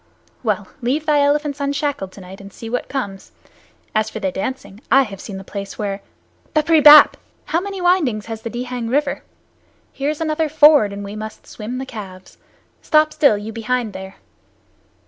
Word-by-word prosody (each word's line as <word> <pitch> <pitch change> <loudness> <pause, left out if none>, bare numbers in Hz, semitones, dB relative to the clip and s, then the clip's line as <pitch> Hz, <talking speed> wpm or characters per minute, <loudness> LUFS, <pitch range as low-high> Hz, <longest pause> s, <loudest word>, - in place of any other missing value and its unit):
Well, - - -1
leave 275 +6 -1
thy 300 -1 +3
elephants 290 0 +1
unshackled 280 -8 -2
tonight 190 0 -12
and 195 0 -11
see 225 +3 -9
what 245 - -3
comes. 200 -8 -5 0.6
As 215 0 +1
for 220 - -6
their 190 -3 -1
dancing, 205 0 -5
I 270 0 +6
have 195 -5 -8
seen 200 -3 -7
the 190 - -8
place 200 0 -7
where 200 -1 -3 0.5
Bapree 310 +1 +4
bap! 300 +1 +9 0.3
How 335 -1 0
many 395 -1 -5
windings 315 - +2
has 225 -1 -6
the 230 - -5
Dihang 245 0 -4
River? 280 +2 0 0.7
Here 275 +1 -2
is 305 - -3
another 315 -1 0
ford, 295 -7 +6
and 200 0 -6
we 200 +1 -7
must 215 0 -8
swim 230 +3 -7
the 265 - -4
calves. 195 -6 -10 0.4
Stop 305 -1 +3
still, 280 -8 +4
you 215 +2 -7
behind 230 0 -2
there." 190 0 -8
245 Hz, 175 wpm, -20 LUFS, 205-295 Hz, 0.7 s, bap